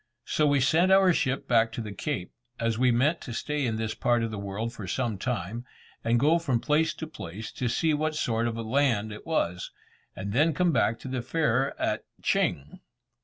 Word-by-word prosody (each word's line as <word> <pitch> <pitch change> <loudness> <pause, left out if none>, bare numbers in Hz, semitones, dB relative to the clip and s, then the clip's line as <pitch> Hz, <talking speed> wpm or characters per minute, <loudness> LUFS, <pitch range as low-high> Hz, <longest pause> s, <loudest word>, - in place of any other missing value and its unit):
So 150 - +2
we 145 -1 +3
sent 165 +8 +3
our 190 -2 +6
ship 135 -3 -1
back 115 -2 +3
to - - -5
the 105 -2 -6
Cape, 90 -2 -4 0.3
as 115 -1 0
we 130 0 +4
meant 140 +8 +2
to 120 - -7
stay 150 -1 -1
in 110 - -1
this 110 -1 -2
part 120 -1 +1
of 115 - -2
the 105 - -5
world 100 +4 -4
for 110 -5 -7
some 115 -3 -2
time, 115 -1 -3 0.4
and 115 +1 +2
go 155 +6 +4
from 135 -8 0
place 155 +5 +2
to 160 - -5
place 110 - -8
to 125 - -3
see 160 +6 +1
what 155 +1 0
sort 115 -4 0
of 115 -1 -3
a 115 - -3
land 115 -3 +1
it 105 - -11
was, 90 - -1 0.5
and 100 +2 -5
then 150 +5 +3
come 180 +3 +3
back 115 -5 +2
to - - -8
the 130 -1 -2
fair 135 -1 0
at - - -1 0.2
Ching. 70 +2 0
120 Hz, 215 wpm, -27 LUFS, 110-150 Hz, 0.5 s, our